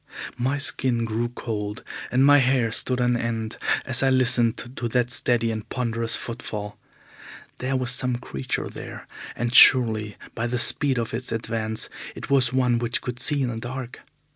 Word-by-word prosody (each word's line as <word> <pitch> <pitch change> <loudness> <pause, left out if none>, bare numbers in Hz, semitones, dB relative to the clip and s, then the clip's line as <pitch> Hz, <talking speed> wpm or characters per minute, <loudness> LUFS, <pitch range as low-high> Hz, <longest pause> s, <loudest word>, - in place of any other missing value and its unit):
My 130 +4 0
skin 125 -4 0
grew 115 +1 -2
cold, 105 -3 -5 0.3
and 130 +2 +3
my 145 0 +7
hair 125 -3 +2
stood 125 +3 -1
on 125 0 +2
end 115 -1 -3 0.3
as 125 -2 0
I 135 - +3
listened 120 -3 +3 0.2
to 120 - -3
that 125 +1 0
steady 115 -2 +3
and 110 -1 -6
ponderous 115 -2 -1
footfall. 105 -3 -6 0.8
There 130 +2 -2
was 130 -1 0
some 125 -1 0
creature 65 - -4
there, - - -9 0.3
and 120 0 -2
surely 110 -5 +6 0.2
by 120 0 -2
the 125 +1 -2
speed 135 +2 +3
of 115 -1 -3
its 120 +2 -3
advance, 110 -1 -2 0.3
it - - -8
was 130 -3 +4
one 125 -2 +2
which 120 0 -1
could 125 -1 -6
see 145 +1 +1
in 125 - -1
the 115 - -4
dark. 125 +1 -6
120 Hz, 170 wpm, -24 LUFS, 115-130 Hz, 0.8 s, my